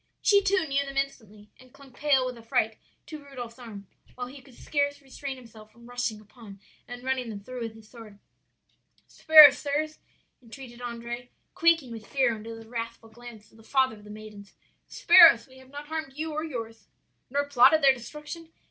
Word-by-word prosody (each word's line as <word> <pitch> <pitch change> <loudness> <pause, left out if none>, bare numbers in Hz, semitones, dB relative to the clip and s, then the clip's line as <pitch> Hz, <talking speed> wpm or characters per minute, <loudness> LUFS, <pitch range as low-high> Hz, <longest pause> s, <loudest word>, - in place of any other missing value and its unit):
"She 405 -2 +4
too 385 -3 +1
knew 275 0 0
them 275 0 -8
instantly, 215 -7 -5
and 255 -1 -18
clung 280 -1 -17
pale 275 -2 +2
with 250 -1 -5
affright 225 -1 -2 0.3
to 305 -2 -10
Rudolph's 250 -4 -9
arm, 215 -5 -10 0.3
while 250 - -5
he 265 +2 -12
could 260 -2 -19
scarce 285 +1 -2
restrain 275 0 -7
himself 220 -3 -15
from 235 +2 -19
rushing 245 -3 -4
upon, 210 -2 -15 0.3
and 245 0 -9
running 260 -2 -2
them 210 -2 -7
through 255 +2 -8
with 225 -1 -6
his 220 -1 -16
sword. 220 -3 -14 0.9
"'Spare 310 -2 +9
us, 275 - -8
sirs,' 305 +2 -3 0.4
entreated 245 0 -12
Andrea, 240 0 -6 0.3
quaking 330 -7 +2
with 225 -2 -9
fear 260 -4 +1
under 225 +1 -8
the 225 0 -13
wrathful 230 -1 -7
glance 220 -2 -14
of - - -21
the 225 - -18
father 260 -1 +1
of 210 - -17
the 210 - -14
maidens, 210 -1 -12 0.3
'spare 345 -1 +8
us; 230 -5 -2
we 260 -1 -18
have 260 0 -18
not 290 +1 -9
harmed 315 -2 -5
you 315 +2 -4
or 310 +1 -3
yours.' 225 -8 -7 0.4
"'Nor 285 +2 -1
plotted 285 +3 +5
their 270 -1 +7
destruction? 300 +6 -10
250 Hz, 190 wpm, -27 LUFS, 225-280 Hz, 0.9 s, Spare